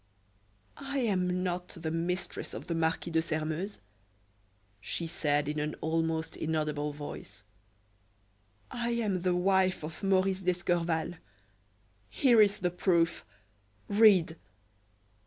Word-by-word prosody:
"I 275 0 -4
am 185 -7 +1
not 180 0 -2
the 160 -2 -5
mistress 175 +3 -3
of - - -7
the 170 - -2
Marquis 165 +1 0
de 160 0 +3
Sairmeuse," 160 +5 -3 1.0
she 135 - -3
said, 145 -3 0
in 150 0 -2
an 150 0 -2
almost 160 0 -1
inaudible 150 -2 -1
voice; 145 0 -9 1.3
"I 240 -1 -2
am 210 -6 0
the 180 0 +1
wife 185 -1 +2
of 155 +1 -7
Maurice 190 -1 +2
d'Escorval. 175 -2 0 0.9
Here 240 - +5
is 205 -1 +4
the 180 -1 -1
proof 170 -2 +1 0.7
read." 200 -6 +5
175 Hz, 115 wpm, -30 LUFS, 160-190 Hz, 1.3 s, Here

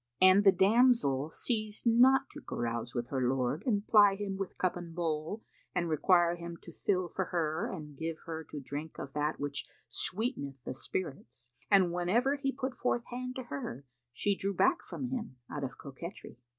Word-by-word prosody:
'" 120 - -54
And 185 +2 +7
the 195 - +8
damsel 190 - +4
ceased 215 +4 -2
not 255 +3 +6
to - - -9
carouse 120 +1 -3
with 120 0 -2
her 135 -2 -1
lord 130 +4 0
and 210 -4 +1
ply 205 -3 +6
him 195 -1 -3
with 195 -1 -5
cup 185 - +1
and 170 -2 -7
bowl 165 +4 -2 0.3
and 175 -1 +1
require 175 +2 +3
him 170 0 -7
to 170 - -11
fill 185 0 0
for 190 +2 -2
her 160 -3 -1
and 150 -5 -7
give 160 0 -3
her 160 -1 -5
to 150 - -7
drink 145 +3 -6
of 135 - -7
that 150 +1 -1
which 145 0 -3 0.2
sweeteneth 180 - -2
the - - -3
spirits, 130 -3 -5 0.2
and 190 -4 +5
whenever 225 +11 +2
he 275 -1 -1
put 260 -1 -3
forth 240 -1 0
hand 250 +1 -4
to 260 - -4
her, 140 - -6 0.3
she 200 +10 +1
drew 195 0 -2
back 350 - +3
from 255 - -5
him, 240 - -4 0.2
out 145 - -4
of 135 - -4
coquetry. 150 +1 -9
175 Hz, 190 wpm, -32 LUFS, 145-215 Hz, 0.3 s, the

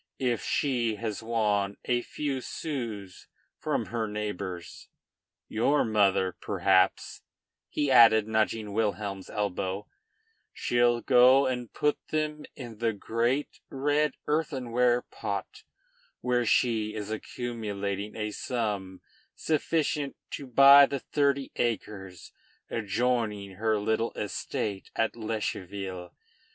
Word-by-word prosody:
If 125 -3 0
she 120 -6 0
has 110 0 -4
won 105 -3 0
a 120 -1 +1
few 140 0 -3
sous 115 - -5 0.3
from - - -1
her 115 -2 -1
neighbors 100 -4 -5 0.6
your 135 +7 +2
mother, 100 -4 +2
perhaps," 95 -1 +2 0.5
he 145 -2 0
added, 110 -4 +7
nudging 110 -1 0
Wilhelm's 100 -3 -2
elbow 100 -1 -2 0.7
"she'll 120 0 +2
go 130 +2 +6
and 125 -3 -2
put 150 0 0
them 150 -1 -2
in 120 -5 -9
the 115 -1 +1
great 120 +7 -1
red 145 +1 +1
earthenware 125 -5 +1
pot, - - -5 0.6
where 125 -1 +1
she 110 -3 +2
is 105 0 -5
accumulating 105 -3 -4
a 105 -1 -3
sum 105 -6 -3 0.3
sufficient 150 -2 0 0.2
to 140 - -6
buy 140 +3 +8
the 140 - -2
thirty 140 0 0
acres 100 -6 -3 0.4
adjoining 110 -2 -1
her 110 +1 +1
little 110 +2 0
estate 100 0 -4
at 110 0 0
Lescheville. 100 -4 -4
115 Hz, 105 wpm, -28 LUFS, 105-125 Hz, 0.7 s, buy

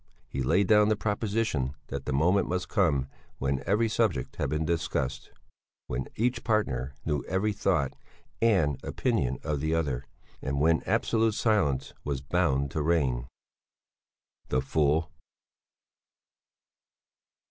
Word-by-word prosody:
He 65 - -4
laid 85 +10 +3
down 105 +1 +5
the 110 - +3
proposition 105 - -1
that 70 0 -5
the - - -2
moment 85 +9 +3
must 90 -1 -1
come 80 - +2 0.3
when 70 0 -1
every 105 +4 +3
subject 95 - 0
had - - -1
been 75 +1 -1
discussed, 80 -5 -2 0.6
when 65 +1 -3
each 120 +2 0
partner 70 - 0
knew 75 -3 0
every 100 +3 0
thought 90 -9 +1 0.5
and 90 - +2
opinion 65 0 0
of 75 -2 -1
the 80 +3 0
other, 70 -6 -1 0.3
and 70 +1 -2
when 80 +2 +3
absolute 115 -2 +2
silence 75 - +1
was 70 -2 -2
bound 70 -2 +1
to 80 - -1
reign. 70 -7 +1 1.2
The 65 - +2
fool! 75 +4 +1
80 Hz, 125 wpm, -28 LUFS, 70-100 Hz, 1.2 s, down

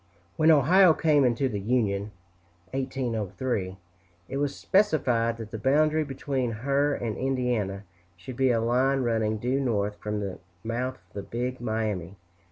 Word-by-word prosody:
When 155 - +4
Ohio 165 +4 +6
came 150 -3 +3
into 125 +2 +2
the 105 -5 -3
Union 105 -2 0 0.6
(1803), 120 -6 -2 0.5
it 135 - -3
was 140 0 -1
specified 125 - +2
that 110 -2 -8
the 110 - -5
boundary 155 +5 +3
between 135 -2 -2 0.2
her 140 +1 +2
and 110 -3 -3
Indiana 125 -7 -1 0.3
should 105 +8 -9
be 130 +1 +2
a 115 -2 +2
line 130 +4 +2
running 110 -2 0
due 125 +5 0
north 105 -6 -1
from 105 0 -3
the 100 -2 -5 0.2
mouth 125 +3 -2
of - - -32
the 100 - -4
Big 120 +6 -4
Miami. 105 -6 -2
125 Hz, 150 wpm, -27 LUFS, 110-135 Hz, 0.6 s, Ohio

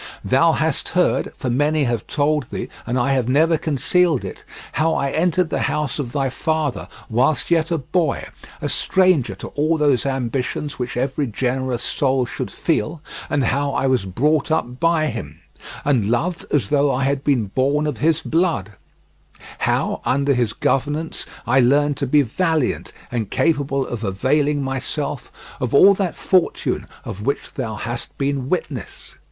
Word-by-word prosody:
Thou - - +4
hast - - 0
heard, - - +2
for 125 - -2
many 145 +4 +2
have 120 -4 -1
told 150 -1 +1
thee, - - -5 0.2
and 125 - 0
I 135 +2 +2
have 125 -3 0
never 160 +5 +4
concealed 155 +1 +1
it, - - -8 0.3
how 160 +2 +1
I 140 0 0
entered 175 +1 +1
the - - 0
house 150 0 -2
of 125 -5 -3
thy 135 0 0
father 155 +1 -1 0.2
whilst 130 +7 +1
yet 165 -1 +3
a 170 - +1
boy—a 155 +1 -3
stranger 180 - +2
to - - -8
all 155 +3 +1
those 145 -3 +2
ambitions 135 +2 -2
which 125 -1 -3
every 135 +3 0
generous 125 +1 -1
soul 130 0 +1
should - - -5
feel—and 145 +1 -2
how 140 +4 0
I 140 - 0
was 130 -7 +2
brought 145 - +1
up 125 -5 -1
by 165 -2 +3
him, 110 - -5 0.5
and 125 -8 +2
loved 165 +9 -1
as 145 - +1
though 145 -1 +3
I 135 0 0
had 135 0 0
been 135 -7 +2
born 140 +3 +2
of 145 -7 -3
his 160 +2 +2
blood; 160 - 0 0.9
how - - 0
under 140 +2 +2
his 120 -4 +1
governance 150 +4 -1 0.2
I 130 - +3
learned 145 +3 +3
to 140 - -1
be 145 +2 +4
valiant 160 +3 0 0.2
and 115 -4 -2
capable 140 -4 +1
of 120 -2 -5
availing 140 +9 +1
myself 135 +1 -3 0.3
of 125 -1 -1
all 195 +7 +8
that 190 -3 -2
fortune, 185 -2 +1 0.2
of 100 - -6
which 140 +4 -2
thou 115 -5 -4
hast 120 +3 -5
been 135 -2 -1
witness. 140 - -4
140 Hz, 160 wpm, -21 LUFS, 125-155 Hz, 0.9 s, all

